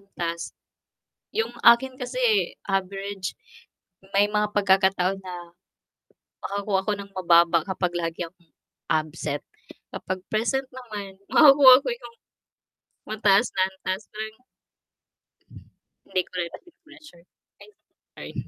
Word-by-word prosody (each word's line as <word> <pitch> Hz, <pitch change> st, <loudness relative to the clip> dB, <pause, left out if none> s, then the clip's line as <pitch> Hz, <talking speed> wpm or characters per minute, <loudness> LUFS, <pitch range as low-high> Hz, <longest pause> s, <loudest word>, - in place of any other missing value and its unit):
antas, 170 Hz, -4 st, -5 dB, 0.9 s
yung 225 Hz, +1 st, 0 dB
akin 255 Hz, +3 st, +5 dB
kasi 250 Hz, 0 st, -6 dB
eh, 220 Hz, -6 st, +3 dB, 0.2 s
average, 195 Hz, 0 st, -3 dB, 0.8 s
may 205 Hz, +1 st, +5 dB
mga 210 Hz, 0 st, 0 dB
pagkakataon 195 Hz, -1 st, +2 dB
na 185 Hz, -1 st, -8 dB, 1.1 s
makakuha 200 Hz, -1 st, -1 dB
ako 210 Hz, -, 0 dB
ng 200 Hz, 0 st, -9 dB
mababa 170 Hz, -2 st, +4 dB
kapag 185 Hz, -2 st, -2 dB
lagi 170 Hz, 0 st, -3 dB
akong 170 Hz, -1 st, -22 dB, 0.4 s
absent 155 Hz, -2 st, -2 dB, 0.5 s
kapag 185 Hz, 0 st, -5 dB
present 250 Hz, +5 st, 0 dB
naman 210 Hz, -7 st, -8 dB
makakuha 275 Hz, -3 st, +8 dB
ko -, -, -4 dB
yung, 470 Hz, -1 st, -14 dB, 0.9 s
mataas 210 Hz, +1 st, +3 dB
na 185 Hz, -, +4 dB
antas 190 Hz, +1 st, -5 dB
tuwing 220 Hz, +1 st, -7 dB, 1.7 s
Hindi 185 Hz, -, -1 dB
ko -, -, -51 dB
rin 170 Hz, -, -1 dB
nape-pressure, 320 Hz, -, -16 dB, 0.4 s
ay -, -, -14 dB, 0.4 s
sorry. -, -, -10 dB
195 Hz, 110 wpm, -25 LUFS, 185-225 Hz, 1.7 s, makakuha